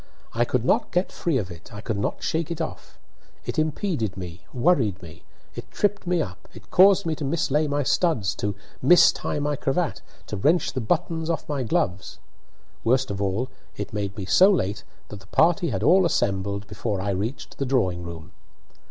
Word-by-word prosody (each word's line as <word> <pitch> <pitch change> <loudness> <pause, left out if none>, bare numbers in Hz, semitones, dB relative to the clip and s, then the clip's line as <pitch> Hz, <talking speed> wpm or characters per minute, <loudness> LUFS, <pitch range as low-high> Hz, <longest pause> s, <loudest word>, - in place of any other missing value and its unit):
I 120 +1 +2
could 125 -1 -1
not - - +2
get 180 +2 0
free 165 -6 0
of 95 -6 -3
it; 85 0 -12
I 105 - -8
could 105 -1 -3
not - - -2
shake 160 0 -1
it 170 - -4
off. - - -6 0.5
It - - -2
impeded 155 - -1
me, 90 -2 -7
worried 125 - +2
me, 80 -1 -11 0.3
it - - -8
tripped 205 -2 -1
me 175 -2 +2
up, 90 -3 -10
it - - -14
caused 195 +1 +6
me 165 - 0
to 155 - -5
mislay 150 0 +1
my 145 0 0
studs, 130 - +1
to 105 -1 -2 0.3
mistie 150 0 +4
my 145 0 0
cravat, 150 +5 -1 0.2
to 105 - -5
wrench 160 - +2
the 130 - -2
buttons 165 +5 -1
off 165 - -2
my 145 -3 -2
gloves. 95 -5 -1 0.7
Worst 130 +1 +2
of 100 0 -4
all, 100 +6 -1 0.3
it 105 - -5
made 100 -1 -3
me 95 - -4
so 185 - +6
late 105 - 0 0.3
that 105 - -8
the - - -18
party 170 +1 +3
had - - -2
all 190 +2 +6
assembled 100 - 0
before 105 0 -3
I 100 +1 -1
reached 105 +8 -4
the 140 - 0
drawing 95 -10 +1
room. 85 0 -8
125 Hz, 190 wpm, -24 LUFS, 100-160 Hz, 0.7 s, caused